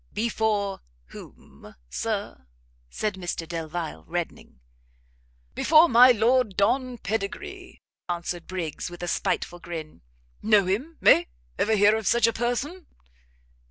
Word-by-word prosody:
"Before 210 -3 -1 0.3
whom, - - -14
Sir?" 65 +1 -4 0.4
said 210 - -2
Mr 175 -3 -5
Delvile, 165 - -5
reddening. - - -5 0.9
"Before 320 +2 +5
my 250 -2 +7
Lord 235 -2 +2
Don 250 +5 +1
Pedigree," 225 - -5 0.3
answered 175 0 -4
Briggs, 180 -3 -4
with 175 0 -9
a - - -3
spiteful 175 0 -2
grin, 165 -3 -8 0.4
"know 210 -3 +4
him? 255 - -2
eh? 115 - +6 0.3
ever 220 +1 +2
hear 205 +1 +5
of 220 -3 -3
such 235 -2 +4
a 230 - +2
person?" 270 +10 -3
205 Hz, 120 wpm, -25 LUFS, 175-240 Hz, 0.9 s, my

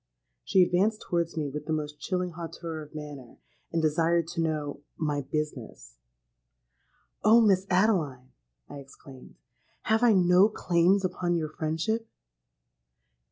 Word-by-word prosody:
She 190 -2 +4
advanced 200 +5 +1
towards 170 -1 -1
me 150 -2 -1
with 150 +2 -6
the 160 - 0
most 150 -1 -4
chilling 180 -1 -2
hauteur 165 -1 -7
of 150 0 -13
manner, 145 -5 -9 0.3
and 165 -1 -1
desired 165 +2 +2
to 170 -1 -3
know 150 -3 -2 0.2
'my 150 -2 -1
business.'—'Oh! - - -3
Miss 195 -3 +3
Adeline,' 165 - +1 0.4
I 145 - -9
exclaimed, 135 -1 -14 0.5
'have 220 +1 +2
I 240 -2 +5
no 180 +2 +5
claims 185 0 +2
upon 175 -1 -1
your 155 -2 -2
friendship?' 165 +9 -2
160 Hz, 125 wpm, -27 LUFS, 145-180 Hz, 0.5 s, I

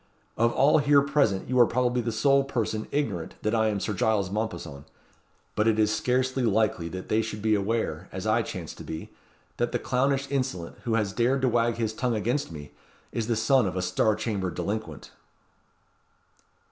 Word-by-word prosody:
Of 115 +1 +2
all 145 +3 +4
here 145 -1 +4
present 140 -9 +1
you 125 0 +1
are 120 - +7
probably 125 0 +1
the 115 0 -2
sole 135 +5 +3
person 115 -5 -2
ignorant 110 - -2
that 110 - 0
I 110 -1 +3
am 105 -2 0
Sir 105 - -2
Giles 100 -1 +1
Mompesson. 105 -10 -4 0.7
But 105 - +2
it 110 -1 +3
is 110 0 +3
scarcely 130 +3 0
likely 110 -7 +1
that 95 +2 -7
they 110 +1 +2
should 110 -1 -5
be 110 -1 +3
aware, 100 -5 -1
as 95 +2 -6
I 110 +2 +3
chance 90 -7 -6
to - - -11
be, 80 - -7 0.5
that 120 0 -1
the - - +2
clownish 135 +2 0
insolent 130 -11 -3
who 115 -2 +1
has 105 -3 0
dared 130 +4 +1
to 130 - +4
wag 120 0 +1
his 110 -2 -2
tongue 125 +1 -1
against 120 +3 -1
me, 75 -2 -9 0.4
is 115 -2 -2
the 115 - +1
son 115 +1 +3
of 90 - -4
a 90 - -1
Star 105 +3 +2
Chamber 105 -4 -2
delinquent." 95 -5 -5
110 Hz, 190 wpm, -27 LUFS, 100-125 Hz, 0.7 s, are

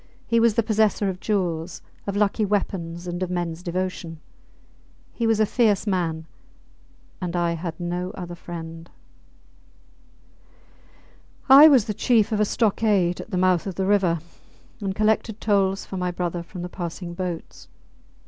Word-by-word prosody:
He 230 - +2
was 230 -2 +3
the 230 - +3
possessor 215 -2 +2
of 185 -1 -5
jewels, 175 -5 -2 0.2
of 200 - -2
lucky 210 +1 +1
weapons, 180 -4 -2
and 175 0 -4
of 185 - -1
mens 175 -2 -3
devotion. 180 -2 -4 0.9
He 230 - -1
was 225 -1 +2
a 215 - +5
fierce 210 -2 +2
man; 170 -5 -1 1.0
and 180 -1 -3
I 170 -1 +1
had 170 0 -5
no 175 +1 -3
other 175 -2 -6
friend. 165 -1 -8 2.6
I 275 +4 +10
was 265 -8 +5
the 210 - -2
chief 220 0 +2
of 215 - 0
a 210 - +4
stockade 205 -5 +1
at - - -11
the 185 - -2
mouth 185 0 +2
of 190 - -4
the 190 - -1
river, 190 -4 +3 0.6
and 195 -3 -3
collected 215 +1 +1
tolls 195 -3 +1
for 190 - -6
my 180 0 -1
brother 175 -1 -3
from 175 +1 -8
the - - -3
passing 175 0 -6
boats. 175 -2 -6
185 Hz, 155 wpm, -24 LUFS, 175-210 Hz, 2.6 s, I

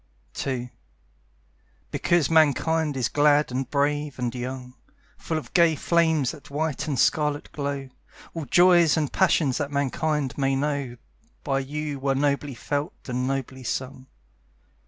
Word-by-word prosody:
II 125 -2 -3 1.2
Because 170 -5 +2
Mankind 160 -1 +2
is 125 - +1
glad 145 -1 +3
and 130 +1 -3
brave 145 -1 0
and 125 -2 -2
young, 125 0 -6 0.5
Full 160 - -2
of 155 - -7
gay 170 -3 +5
flames 160 -3 +2
that 150 -3 -13
white 150 0 -2
and 145 -3 -1
scarlet 150 +1 +1
glow, 140 -2 -4 0.5
All 165 -3 -5
joys 175 +2 +5
and 150 -3 -1
passions 160 -8 +2
that 145 -1 -2
Mankind 145 0 -1
may 135 0 +2
know 140 -3 -2 0.5
By 135 -1 0
you 145 +1 -4
were 135 0 0
nobly 140 -1 0
felt 145 +4 -3
and 125 0 -1
nobly 130 -1 -3
sung. 130 +2 -4
145 Hz, 135 wpm, -25 LUFS, 135-155 Hz, 1.2 s, gay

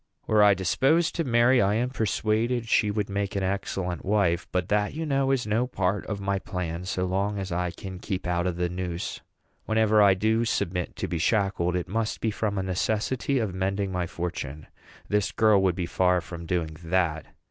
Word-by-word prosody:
Were 110 -1 +3
I 100 -1 +6
disposed 135 - +2
to 165 - -1
marry, 120 -1 +4
I 100 +1 +2
am 125 +3 0
persuaded 115 +1 0
she 105 -1 +3
would 105 -1 -1
make 100 0 -2
an 100 - 0
excellent 95 -2 -2
wife; 90 -4 +1
but 90 -1 0
that, 105 +4 +1
you 160 +1 -3
know, 135 -2 +1
is 135 -2 +1
no 110 +4 +1
part 95 -4 -1
of 105 -2 -3
my 100 0 -1
plan, 90 -2 -4
so 90 0 -1
long 100 +3 -1
as 95 -2 -4
I 90 +1 0
can 95 +2 -8
keep 95 -2 -4
out 90 0 0
of 90 - -1
the 90 0 0
noose. 90 -1 -4 0.4
Whenever 110 -1 +3
I 100 -2 +6
do 110 +4 +1
submit 90 -6 -1
to - - -3
be 85 - -3
shackled, 95 -2 +1
it 90 -1 -2
must 110 +3 -2
be 110 - 0
from 105 -1 -2
a 95 - 0
necessity 110 +8 0
of 110 -6 -1
mending 95 +1 -1
my 90 -1 -1
fortune. 80 -4 -5 0.4
This 105 0 +1
girl 110 -3 +4
would 95 -2 +2
be 90 - -2
far 90 +1 +2
from 85 -1 -8
doing 80 -3 -2
that. 80 -2 0
100 Hz, 200 wpm, -26 LUFS, 90-110 Hz, 0.4 s, I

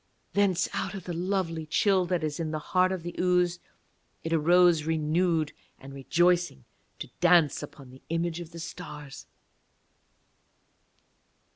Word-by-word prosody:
Thence, 195 -3 +2
out - - -3
of 190 - -7
the 175 - -5
lovely 170 -3 -2
chill 190 +2 +2
that 175 -2 -1
is 150 0 -3
in 165 -2 -2
the 155 - -2 0.2
heart 185 0 +4
of 185 -3 -4
the 175 - -6
ooze, 180 -1 +2 0.6
it 165 - -2
arose 170 0 +4
renewed 160 0 0 0.3
and 135 +1 -11
rejoicing 170 -1 +1 0.3
to - - -8
dance 175 -4 +4
upon 140 -3 -11
the 130 - -15
image 165 0 -1
of 170 -2 -8
the 170 - -12
stars. 150 -4 -9
170 Hz, 140 wpm, -28 LUFS, 155-180 Hz, 0.6 s, heart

